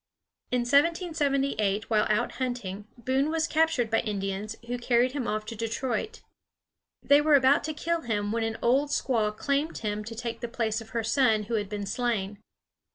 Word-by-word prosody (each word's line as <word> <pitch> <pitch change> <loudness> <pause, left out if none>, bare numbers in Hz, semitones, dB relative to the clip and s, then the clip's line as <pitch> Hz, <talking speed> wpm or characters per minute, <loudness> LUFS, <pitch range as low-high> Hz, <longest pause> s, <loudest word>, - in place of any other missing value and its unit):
In 250 -1 +1
1778, 275 - +1
while 215 -1 +3
out 210 - +1
hunting, 215 -5 -3
Boone 260 +5 0
was 320 0 +1
captured 315 -9 +1
by 225 - +3
Indians, 200 0 -3
who 245 +1 -3
carried 245 +1 +2
him 270 -3 -3
off 215 0 -2
to 230 - -6
Detroit. 230 - -3 0.8
They 285 +1 +5
were 300 0 +5
about 270 +1 +4
to 310 - -3
kill 335 +2 -1
him 205 -5 -2
when 230 +1 0
an 225 0 -2
old 270 +5 +3
squaw 230 -7 +1
claimed 285 +3 -1
him 210 -1 -3
to 230 +1 -7
take 230 0 -4
the 240 - -4
place 225 -1 -1
of 225 - -12
her 230 0 -2
son 225 -3 +3
who 225 +3 -6
had 205 -3 -1
been 205 -1 -4
slain. 205 -2 -2
235 Hz, 180 wpm, -27 LUFS, 215-275 Hz, 0.8 s, They